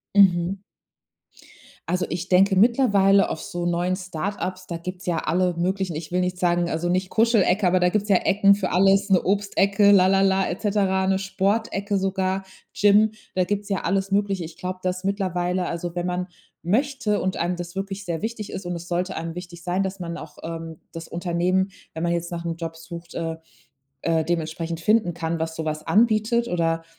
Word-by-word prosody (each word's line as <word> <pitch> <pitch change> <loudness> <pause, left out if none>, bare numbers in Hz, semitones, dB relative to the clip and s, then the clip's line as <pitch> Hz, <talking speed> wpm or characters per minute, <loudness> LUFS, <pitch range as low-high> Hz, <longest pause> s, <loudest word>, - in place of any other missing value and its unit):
Mhm. 190 -1 +4 1.3
Also 180 +1 0
ich 175 +1 -4
denke 190 +2 +4
mittlerweile 200 -3 +4
auf 160 - -4
so 175 0 -4
neuen 175 +1 0
Start-ups, 185 +1 -4
da 170 - -3
gibt's 180 +2 -7
ja 175 -2 0
alle 180 +2 +1
möglichen 185 -1 -1
ich 160 +2 -7
will 180 - +2
nicht 180 0 -1
sagen 175 -1 +1
also 165 +2 -1
nicht 185 +1 0
Kuschelecke, 215 -4 +3
aber 180 +1 +3
da 180 - +4
gibt's 210 +2 -1
ja 195 - +5
Ecken 200 0 +4
für 195 -2 -2
alles, 195 +2 +3
'ne 185 -2 +5
Obstecke, 200 +1 +3
la 190 -2 +6
la 195 +1 +3
la 195 0 +2
et 180 - -4
cetera, 195 -3 +1
'ne 190 0 +2
Sportecke 200 +1 -1
sogar, 190 0 -1 0.3
Gym. 210 +1 +4 0.2
Da 185 - +2
gibt's 205 +2 -3
ja 195 -3 -1
alles 195 +2 0
Mögliche. 200 -3 +1
Ich 160 0 -10
glaube, 185 0 -4
dass 185 0 -2
mittlerweile 185 -2 -1
also 170 0 -4
wenn 175 0 -1
man 180 +1 -2 0.4
möchte 230 - 0
und 185 0 -1
einem 175 +1 -1
das 175 0 -7
wirklich 195 +1 -4
sehr 170 -3 -3
wichtig 220 -2 -4
ist 190 - -5
und 175 0 -3
es 170 0 -8
sollte 180 +1 -2
einem 165 0 -4
wichtig 175 -1 -9
sein, 185 +2 0
dass 190 0 -3
man 170 -2 -5
auch, - - -10
ähm, 165 -1 -6
das 165 -1 -8
Unternehmen, 180 +2 0 0.2
wenn 160 +1 -4
man 170 - +1
jetzt 170 0 -2
nachm 170 -1 -3
Job 165 -1 -6
sucht, 170 +1 -10
äh 165 -1 -3 0.7
äh, 165 -1 +1
dementsprechend 165 0 -2
finden 210 0 +2
kann, 165 -1 -3
was 160 0 -3
so 160 - -3
was 155 0 -3
anbietet 225 +1 +2
oder 165 -4 0
185 Hz, 195 wpm, -24 LUFS, 170-195 Hz, 1.3 s, la